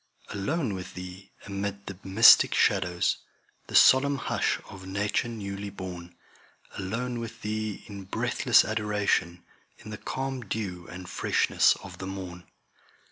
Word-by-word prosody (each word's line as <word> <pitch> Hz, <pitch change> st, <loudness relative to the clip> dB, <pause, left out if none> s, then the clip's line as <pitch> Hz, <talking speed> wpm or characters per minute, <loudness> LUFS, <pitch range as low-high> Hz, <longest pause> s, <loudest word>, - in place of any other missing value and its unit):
Alone 110 Hz, -, -2 dB
with 95 Hz, -1 st, -7 dB
Thee, 90 Hz, +2 st, -9 dB
amid 100 Hz, 0 st, -4 dB
the 100 Hz, -, -7 dB
mystic 100 Hz, +5 st, +7 dB
shadows, 90 Hz, -3 st, +2 dB, 0.5 s
The -, -, -6 dB
solemn 140 Hz, +2 st, +6 dB
hush -, -, 0 dB
of 95 Hz, -1 st, -11 dB
nature 105 Hz, +4 st, -1 dB
newly 100 Hz, -3 st, -5 dB
born; 90 Hz, -3 st, -8 dB, 0.6 s
Alone 120 Hz, +6 st, -3 dB
with 115 Hz, 0 st, -8 dB
Thee 110 Hz, -1 st, -3 dB
in 100 Hz, -2 st, -9 dB
breathless 95 Hz, -, +3 dB
adoration, 105 Hz, -5 st, 0 dB, 0.3 s
In 110 Hz, -, -11 dB
the 105 Hz, -, -7 dB
calm 135 Hz, -1 st, -4 dB
dew 95 Hz, -5 st, -5 dB
and 90 Hz, 0 st, -9 dB
freshness -, -, +2 dB
of -, -, -10 dB
the 95 Hz, -, -5 dB
morn. 90 Hz, -2 st, -7 dB
100 Hz, 135 wpm, -27 LUFS, 95-110 Hz, 0.6 s, mystic